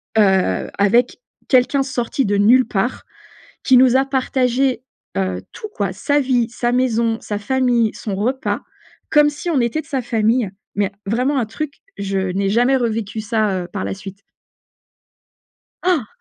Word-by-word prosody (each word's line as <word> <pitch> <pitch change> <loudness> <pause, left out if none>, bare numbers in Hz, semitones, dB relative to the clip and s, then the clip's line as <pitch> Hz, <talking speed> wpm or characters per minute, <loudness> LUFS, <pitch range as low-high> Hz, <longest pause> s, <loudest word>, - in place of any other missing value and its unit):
heu, 190 - +2
avec 235 +5 +2 0.3
quelqu'un 260 +1 +3
sorti 265 0 -2
de 205 0 +1
nulle 240 +5 +5
part, 220 +4 -2 0.6
qui 260 - +5
nous 255 0 +6
a 265 - +3
partagé, 260 -1 0 0.3
heu, 95 -1 -1
tout 430 - -8
quoi, 200 -2 -1
sa 285 +10 +1
vie, 250 -4 +1
sa 240 0 -1
maison, 235 -3 +1
sa 210 - -4
famille, 240 0 +1
son 205 - -5
repas, 250 +7 -1 0.5
comme 295 -1 +5
si 295 +4 -5
on 290 -6 +2
était 235 +5 0
de 310 - -14
sa 270 -3 -2
famille, 225 -1 +1 0.2
mais 200 0 0
vraiment 250 +7 +1
un 240 - 0
truc, 280 +6 -6 0.2
je 195 -1 -2
n'ai 190 +1 -1
jamais 245 +6 +3
revécu 225 -3 -2
ça, 210 -3 0
heu, 175 - -8
par 195 - -3
la - - -3
suite. 195 0 -10 1.6
Han! 345 - +1
235 Hz, 160 wpm, -19 LUFS, 205-260 Hz, 1.6 s, nous